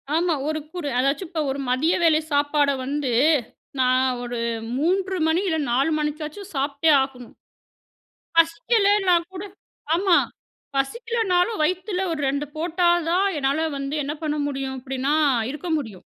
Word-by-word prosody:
ஆமா. 340 0 +2
ஒரு 310 0 -1
குறு 345 -5 -4
அதாச்சும் 280 +6 0
இப்போ 325 -3 -2
ஒரு 280 - -4
மதிய 295 +7 +2
வேளை 315 -2 +5
சாப்பாடு 290 0 +2
வந்து 280 -2 -2 0.7
நான் 255 0 +2
ஒரு 245 0 -4 0.4
3:00 375 +4 0
மணி 330 +4 +2
இல்ல, 320 -2 +1
4:00 270 +6 +2
மணிக்காச்சும் 305 +6 -4
சாப்பிட்டே 280 +3 +1
ஆகணும். 255 -3 -6 1.0
பசிக்கலைன்னா 395 +2 +3 0.2
கூட 365 - -5 0.5
ஆமா, 360 0 +4 0.6
பசிக்கலனாலும் 445 - 0
வயித்துல 370 +3 -1
ஒரு 305 - -3
2:00 285 +2 -1
போட்டா 345 +2 +1 0.2
தான் 380 +3 +3
என்னால 285 +4 +1
வந்து 275 +2 -4
என்ன 295 +2 -3
பண்ண 300 0 -1
முடியும்? 270 -1 -4
அப்படின்னா 265 +2 -1 0.4
இருக்க 305 +4 -7
முடியும். 215 -10 -8
310 Hz, 135 wpm, -23 LUFS, 275-360 Hz, 1.0 s, வேளை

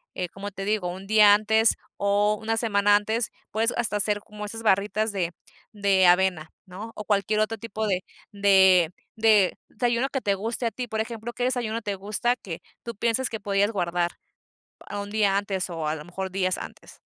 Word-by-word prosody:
eh, 180 -1 -3
como 200 +3 -7
te 195 0 -7
digo, 205 -2 0
un 185 +2 -6
día 210 0 +6
antes 220 +1 +3 0.2
o 205 +1 +1
una 225 +1 -1
semana 205 -3 +3
antes, 220 +2 0 0.2
puedes 225 +2 +2
hasta 225 -3 +1
hacer 205 0 0
como 210 0 -9
esas 225 +2 -6
barritas 210 +1 +1
de 175 -4 -2 0.4
de 200 -3 +3
avena, 175 -3 +3 0.2
¿no? 205 +5 -9
O 210 - -6
cualquier 210 +1 +1
otro 225 +1 -1
tipo 220 0 -4
de 185 -2 0 0.3
de 190 -4 +5 0.3
de 215 -4 +4
desayuno 240 +3 0
que 270 - -3
te 200 - +1
guste 225 +5 -3
a 230 - 0
ti. 250 +1 -5
Por 220 -1 -2
ejemplo, 230 +1 -6
¿qué 245 - -4
desayuno 240 -3 -1
te 205 -2 -3
gusta 215 +5 -1
que 175 -6 -8 0.2
tú 235 - -6
pienses 235 +4 +2
que 225 - -6
podías 200 +1 +1
guardar 175 -3 -1 0.8
un 205 0 -4
día 205 -2 +2
antes 195 -2 -2
o 165 -2 -3
a 155 - -1
lo 150 -1 -9
mejor 190 +2 -5
días 185 -1 0
antes? - - -11
205 Hz, 195 wpm, -25 LUFS, 190-220 Hz, 0.8 s, día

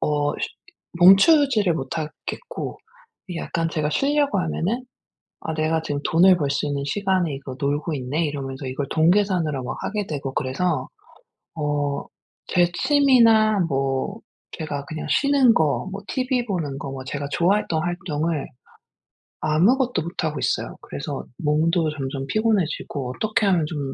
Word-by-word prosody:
어 145 -1 +1
쉬 - - -2 0.5
멈추지를 210 - +6
못하겠고. 160 - -5 0.5
이게 170 -2 -4
약간 165 0 -2
제가 150 -2 -1
쉬려고 285 - +1
하면은 185 +9 -2 0.6
'아 160 - -3
내가 160 +1 +1
지금 145 -2 -3
돈을 180 +2 +6
벌 145 -4 -1
수 140 - -1
있는 140 -1 -2
시간에 185 0 0
이거 135 -1 -8
놀고 145 +3 -1
있네?' 140 +5 -1
이러면서 135 -2 -5
이걸 135 +1 -3
돈 160 +2 +4
계산으로 180 -9 +1
막 125 - -5
하게 210 -1 -2
되고 140 -3 -4
그래서. 135 +1 -1 0.7
어 145 -2 -1 0.4
제 175 -1 +3
취미나 230 -7 +4
뭐 135 +9 -1 0.3
제가 145 -4 -4
그냥 155 +1 -6
쉬는 275 -4 +4
거 155 +3 +1
뭐 200 - -6
티브이 255 -2 -1
보는 160 - -3
거 140 -2 -6
뭐 135 -1 -6
제가 145 +1 -4
좋아했던 175 -2 +1
활동을 165 -3 -2 1.0
아무것도 230 - +2
못하고 160 -2 -3
있어요. - - -1
그래서 - - -5
몸도 160 +2 +2
점점 135 0 -4
피곤해지고 180 - -1
어떻게 215 -1 0
하면 175 -5 +3
좀 150 -2 -4
160 Hz, 300 characters per minute, -23 LUFS, 145-200 Hz, 1.0 s, 멈추지를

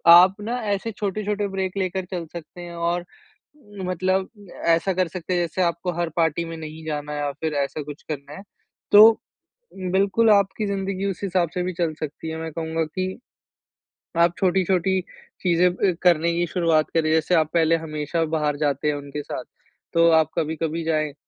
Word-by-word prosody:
आप 180 +3 +8
ना 230 +4 -2 0.2
ऐसे 200 +3 -2
छोटे-छोटे 205 0 -2
ब्रेक 190 -1 -3
लेकर 190 -1 -1
चल 175 -3 -4
सकते 170 +1 -9
हैं। 175 0 -8
और 170 +1 -1 0.8
मतलब 185 +1 0 0.4
ऐसा 170 +3 +3
कर 185 -2 +1
सकते 180 +1 -4
हैं 175 - +2
जैसे 175 +2 -1
आपको 170 +1 0
हर 170 -1 0
पार्टी 165 0 +1
में 165 0 -6
नहीं 155 0 -8
जाना 150 -1 -3
हैं 145 - -3
या 145 - -1
फिर 160 -1 -1
ऐसा 150 +2 -5
कुछ 145 +1 -9
करना 145 -1 -5
हैं। 190 - -9 0.5
तो, 220 +2 +9 0.6
बिल्कुल 195 +4 +2
आपकी 200 +1 +3
ज़िन्दगी 195 -1 -2
उस 180 - -6
हिसाब 180 -3 +1
से 180 - -1
भी 180 +1 -2
चल 170 -2 +1
सकती 155 +1 -5
हैं। 160 - -4
मैं 160 0 -4
कहूँगा 160 0 -2
कि, 185 +4 -3 1.1
आप 170 +1 +4
छोटी-छोटी 190 0 +2 0.4
चीजें 175 -1 +3
अ, 185 +1 +1
करने 170 -1 +4
की 175 +1 +1
शुरुआत 165 -3 +2
करें। 155 -1 +2
जैसे 160 +2 +2
आप 155 -1 +3
पहले 165 -1 +4
हमेशा 160 +1 -2
बाहर 150 -1 0
जाते 145 0 0
हैं 150 - 0
उनके 145 +1 -6
साथ - - -5 0.5
तो 170 0 +5
आप 160 -1 +4
कभी-कभी 160 +1 -2
जाएँ। 155 -2 0
170 Hz, 180 wpm, -23 LUFS, 160-185 Hz, 1.1 s, तो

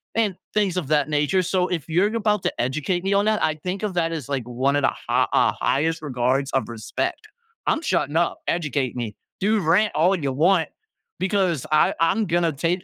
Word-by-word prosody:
and 215 -5 +1 0.2
things 200 -4 +1
of 165 -7 -2
that 150 -2 +2
nature, 150 +5 +2
so, 180 +1 +1
if 165 -4 -3
you're 185 +7 +2
about 210 -3 +1
to - - 0
educate 155 +8 -1
me 195 +1 +1
on 200 +1 +3
that, 215 0 +1
I 155 - +1
think 185 +2 -3
of 210 -3 -1
that 165 -1 +1
as, 155 -7 -5
like, 135 -3 -1
one 130 +3 0
of - - +1
the - - +4 0.2
ha - - +2
ah, - - +3
highest 160 +3 0
regards 135 -1 0
of 135 - 0
respect. 115 - -4 0.4
I'm 320 - +2
shutting 170 - 0
up. 170 0 +1
Educate 145 -6 -1
me. 115 -4 -4 0.2
Dude, 210 0 +1
rant 185 +6 +3
all 175 +5 +3
ya 140 -5 -2
want 165 +5 +3 0.5
because 185 - 0
I 155 - +4
I'm 210 +7 +2
gonna 170 -1 +1
take 170 +6 -1
165 Hz, 205 wpm, -23 LUFS, 140-190 Hz, 0.5 s, the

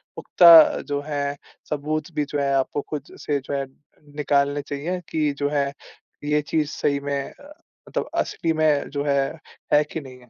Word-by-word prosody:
पुख़्ता 165 -3 +7
जो 145 0 -2
हैं, 145 -1 -2 0.3
सबूत 150 +2 -3
भी 150 - 0
जो 145 - -2
हैं 140 -1 +1
आपको 135 +2 0
खुद 150 -2 -6
से 145 -1 -1
जो - - -5
हैं 140 0 -1 0.5
निकालने 145 -1 +1
चाहिए 145 +6 -4
कि 155 -2 0
जो 145 0 0
हैं 140 -1 0 0.6
ये 150 0 +2
चीज़ 155 -2 +1
सही 140 -1 0
में 140 - 0
अ, 290 +1 -15 0.4
मतलब - - -3
असली 165 -1 -1
में 155 -2 +1
जो 140 0 -3
है, 140 -1 +2 0.5
है 150 0 +6
कि 155 +2 -7
नहीं 130 -2 -12
है। 125 -1 -20
145 Hz, 180 wpm, -23 LUFS, 140-155 Hz, 0.6 s, पुख़्ता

